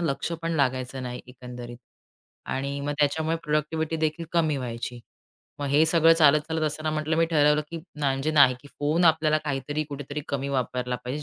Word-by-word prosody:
लक्षपण 165 +2 -2
लागायचं 130 -1 -1
नाही 125 0 -5
एकंदरीत. 125 -1 -9 0.7
आणि 140 +1 -3
मग 145 +1 -2
त्याच्यामुळे 160 +3 +1
प्रॉडक्टिव्हिटी 155 +2 -1
देखील 155 +1 -1
कमी 160 -4 +2
व्हायची. 120 -1 -5 0.6
मग 145 - -3
हे 145 +3 +4
सगळं 165 0 +5
चालत-चालत 155 0 +3
असताना 155 +1 -2
म्हटलं 155 +1 -1
मी 165 - +4
ठरवलं, 150 -2 +3
की 170 - -5 0.2
म्हणजे 140 +1 0
नाही, 140 -4 +6
की 145 - -15
फोन 155 +4 +2
आपल्याला 155 -2 +4
काहीतरी 145 +1 -2
कुठेतरी 145 +1 -5
कमी 140 0 -2
वापरला 125 -2 -1
पाहिजे 135 +5 -4
145 Hz, 160 wpm, -26 LUFS, 135-155 Hz, 0.7 s, नाही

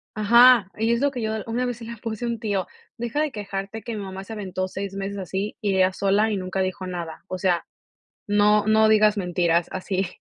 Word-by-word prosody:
Ajá, 235 0 +6
y 225 +2 +1
es 235 - 0
lo 285 - +3
que 255 -3 -6
yo 220 0 -1
una 240 +2 -1
vez 245 -2 -3
se 235 - -9
la 235 +1 -7
puse 225 +1 -5
a - - -1
un 235 -1 -2
tío: 200 -5 -1 0.3
"Deja 240 +4 -3
de 305 -1 0
quejarte 200 0 -5
que 235 -1 -5
mi 205 - -5
mamá 190 0 -7
se 225 - -8
aventó 185 -3 -3
6 195 +1 -5
meses 195 +1 -4
así, 195 +2 -4
y 200 -3 0
ella 185 0 +4
sola 200 +3 +2
y 210 - -1
nunca 185 +1 -4
dijo 185 0 -3
nada. 170 -3 -6
O 185 - -4
sea, 180 -2 +1 0.6
no, 210 0 +3
no 220 0 +5
digas 215 -1 +5
mentiras 175 -3 +1
así". 190 0 -2
205 Hz, 230 wpm, -24 LUFS, 190-225 Hz, 0.6 s, Ajá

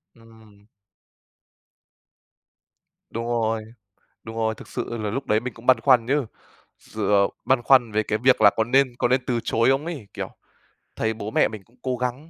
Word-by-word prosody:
Ừm. 110 -3 -20 2.4
Đúng 115 +1 -4
rồi, 115 -2 -1 0.6
đúng 110 0 -9
rồi, 110 -1 -1
thực - - -13
sự 120 -1 -5
là 105 -2 -3
lúc 135 +6 -4
đấy 105 +1 +2
mình 125 +1 -6
cũng 115 +1 -15
băn 130 -3 +5
khoăn 120 -1 +4
chứ, 140 0 +1 0.5
sự - - -4
ờ, 100 -1 +4 0.2
băn 130 -2 +2
khoăn 125 -4 +4
về 110 +1 +1
cái 105 - -1
việc 130 +3 +3
là - - +8
có 110 - +3
nên 130 +1 +2
có - - +2
nên 130 +1 +2
từ 120 -2 0
chối 115 +2 +2
không 135 +3 +1
ấy, 150 -11 -6
kiểu, - - -5 0.7
thấy 110 0 -1
bố 110 -1 -6
mẹ - - +3
mình 110 -3 -9
cũng 120 - -29
cố 130 -1 -2
gắng 125 +6 -4
115 Hz, 190 wpm, -23 LUFS, 110-130 Hz, 2.4 s, là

